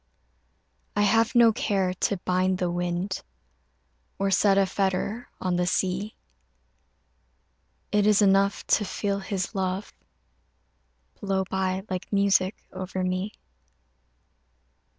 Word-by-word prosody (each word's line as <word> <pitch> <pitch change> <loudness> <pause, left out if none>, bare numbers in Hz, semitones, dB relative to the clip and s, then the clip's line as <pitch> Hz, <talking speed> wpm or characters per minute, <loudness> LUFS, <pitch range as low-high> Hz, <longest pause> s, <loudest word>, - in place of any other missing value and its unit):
I 205 - +3
have 225 +3 +3
no 235 -2 +6
care 190 -3 0
to 195 +2 -1
bind 185 +1 +1
the 180 -1 -1
wind 175 +2 -2 1.0
Or 195 0 0
set 195 +1 +4
a 195 - +5
fetter 195 +4 -2
on 180 -1 -1
the 180 0 0
sea 190 +4 -1 1.8
It 210 0 +3
is 210 -1 +5
enough 200 -1 +3
to - - +2
feel 200 0 -2
his 190 0 -3
love 190 0 -2 1.3
Blow 195 -1 0
by 190 0 -1
like 185 -1 -5
music 200 -1 +2 0.2
over 185 0 -4
me. 185 +3 -2
195 Hz, 110 wpm, -26 LUFS, 185-200 Hz, 1.8 s, no